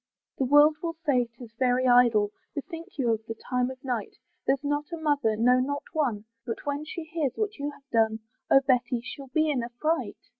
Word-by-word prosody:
The 265 - +2
world 295 +3 +6
will 330 -1 -3
say 255 -5 +3
'tis 235 -1 -13
very 255 0 +2
idle, 235 -4 +5 0.2
Bethink 330 +4 -7
you 245 -4 +2
of 220 0 -1
the 225 - -4
time 250 +1 -1
of 260 0 -10
night; 245 -6 -3 0.3
There's 275 +1 +2
not 290 +2 -2
a 335 - -3
mother, 285 -8 +1
no 250 +3 +4
not 285 +3 -1
one, 245 -10 0 0.2
But 230 -3 -5
when 290 +1 -2
she 330 +1 -6
hears 315 -5 -2
what 420 -1 -2
you 285 +1 -2
have 280 -1 -14
done, 220 -1 +2 0.3
Oh! 270 - +7
Betty 250 -2 +2
she'll 275 +1 -8
be 310 +4 +1
in 260 -4 0
a 235 - -5
fright. 310 +8 -1
265 Hz, 210 wpm, -27 LUFS, 240-295 Hz, 0.3 s, Oh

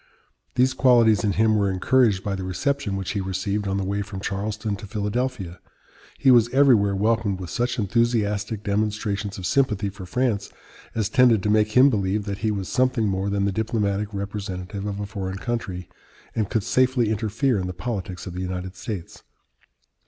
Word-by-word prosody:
These 130 +1 +3
qualities 120 -5 +4
in 105 -2 +1
him 110 +1 +3
were 100 -1 +2
encouraged 100 +1 +2
by 100 - -2
the 95 -1 -4
reception 100 +4 -1
which 95 -1 -3
he 100 - -2
received 95 +2 -2
on 95 0 0
the 100 - -1
way 100 +2 -1
from 100 -1 -6
Charleston 105 +1 -3
to 105 +1 -9
Philadelphia. 105 -2 -3 0.6
He 135 - +4
was 120 -2 +5
everywhere 120 -7 +4
welcomed 105 -1 +1
with 90 -2 -7
such 120 0 -1
enthusiastic 105 -1 0
demonstrations 105 0 -1
of 95 - -6
sympathy 105 -7 +1
for 95 -2 -10
France 115 -3 0 0.5
as 110 -3 +1
tended 125 -6 +4
to 105 - +1
make 105 0 +2
him 135 +2 +7
believe 100 -1 0
that 100 -1 -4
he 110 - 0
was 100 -3 -2
something 125 -3 +1
more 95 0 -1
than 100 0 0
the 100 - +1
diplomatic 105 -1 -1
representative 100 -1 -5
of 100 -1 -4
a 105 - -3
foreign 95 -1 -5
country, 100 -6 -4 0.5
and 110 -4 -1
could 110 - 0
safely 125 -2 +2
interfere 110 +2 0
in 90 - -3
the - - -3
politics 90 -1 -5
of 90 - -6
the 90 - -4
United 90 0 -4
States. 95 -4 -7
105 Hz, 180 wpm, -24 LUFS, 95-115 Hz, 0.6 s, him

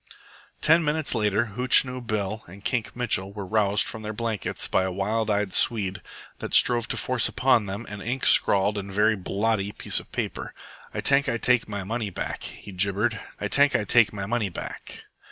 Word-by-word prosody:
Ten 160 +2 +4
minutes 150 0 -1
later 110 0 0
Hootchinoo 125 +1 +3
Bill 105 0 -3
and 100 +4 -14
Kink 120 -4 -2
Mitchell 105 -5 0
were 100 -1 -7
roused 105 0 +2
from 110 - -4
their 110 0 -5
blankets 110 -2 -3
by - - +1
a 95 0 -2
wild 105 +4 -2
eyed 105 -2 -1
Swede 100 -5 0 0.4
that - - -3
strove 120 -1 +3
to - - -3
force 130 -3 +1
upon 125 -5 +2
them 100 +4 -6
an 105 -1 -8
ink 125 +5 -3
scrawled 100 +1 +4
and 100 0 -8
very 105 +3 +2
blotty 100 +1 -1
piece - - +1
of - - -15
paper. - - -5 0.4
"Ay - - -4
tank 140 0 +3
Ay 115 - -1
take 120 -1 +3
my 100 -2 -4
money 110 +2 -3
back," 90 - -5
he 100 - -9
gibbered. 100 +4 -1 0.2
"Ay 105 - -2
tank 140 +6 +4
Ay - - +1
take 115 +2 +4
my 100 -2 -5
money 110 -1 -1
back." 85 - -8
110 Hz, 190 wpm, -25 LUFS, 100-120 Hz, 0.4 s, Ten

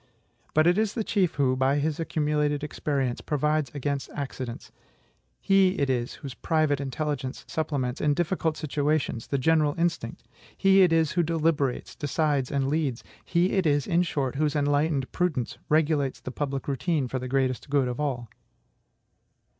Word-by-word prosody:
But 155 0 +5
it 175 +4 +4
is 220 -2 0
the 225 - 0
chief 190 -5 +1
who, 130 -3 +2
by 130 +2 +2
his 150 +2 -1
accumulated 150 -2 0
experience, 140 -4 -2
provides 150 -1 0
against 140 0 -2
accidents; 130 -4 -5 0.7
he 195 -1 +3
it 140 -2 +1
is 120 -1 -2
whose 135 -3 -8
private 155 0 +1
intelligence 140 -1 -3
supplements, 140 -5 -2
in 145 -1 +2
difficult 165 -1 0
situations, 150 -5 -1
the 140 - 0
general 150 +1 +2
instinct; 170 -9 -2 0.3
he 195 0 +5
it 180 -3 +5
is 160 -2 +3
who 175 - +2
deliberates, 160 -5 0
decides, 145 -2 0
and 140 -1 0
leads; 140 -4 -1 0.2
he 175 +2 +1
it 190 -4 +2
is, 145 -2 +2
in 170 +1 +2
short, 140 -7 -1
whose 150 0 +1
enlightened 145 -1 +1
prudence 155 -10 -1
regulates 150 -3 +2
the 130 - -7
public 140 0 -3
routine 140 +1 0
for 130 +1 -3
the 130 - -5
greatest 130 +1 -1
good 140 -2 +2
of 125 +1 -4
all. 130 -5 -2
145 Hz, 160 wpm, -26 LUFS, 135-160 Hz, 0.7 s, But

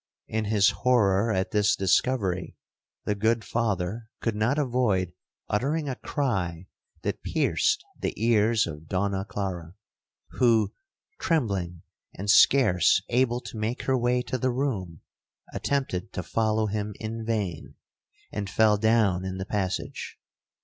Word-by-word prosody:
In 110 0 -2
his 105 0 +4
horror 110 -4 +2
at 95 -1 -1
this 105 0 +3
discovery, 95 -2 0 0.5
the 105 - +1
good 110 +2 +1
Father 110 -1 -2
could 115 -2 -1
not 110 +7 +1
avoid 120 - +1 0.3
uttering 145 +8 0
a 130 - -2
cry 95 - -2 0.4
that - - -2
pierced 430 -1 +1 0.2
the - - -1
ears 115 0 +3
of 80 0 -8
Donna 95 +1 -1
Clara, 95 -4 -5 0.5
who, 115 -5 +2 0.5
trembling 100 - -1 0.3
and 100 +2 0
scarce 100 -9 +5
able 120 0 +2
to 110 - -8
make 110 +4 -2
her 130 - +1
way 125 0 +1
to 130 +1 -3
the 130 - +1
room, 110 - -2 0.5
attempted 135 -11 -2
to 90 - -3
follow 110 +4 +1
him 105 0 -3
in 115 +1 -5
vain, 105 -8 -3 0.6
and 100 -2 -4
fell 110 0 +4
down 105 -4 +2
in 95 0 -4
the 95 - -4
passage. 95 -2 -3
110 Hz, 135 wpm, -26 LUFS, 95-120 Hz, 0.6 s, scarce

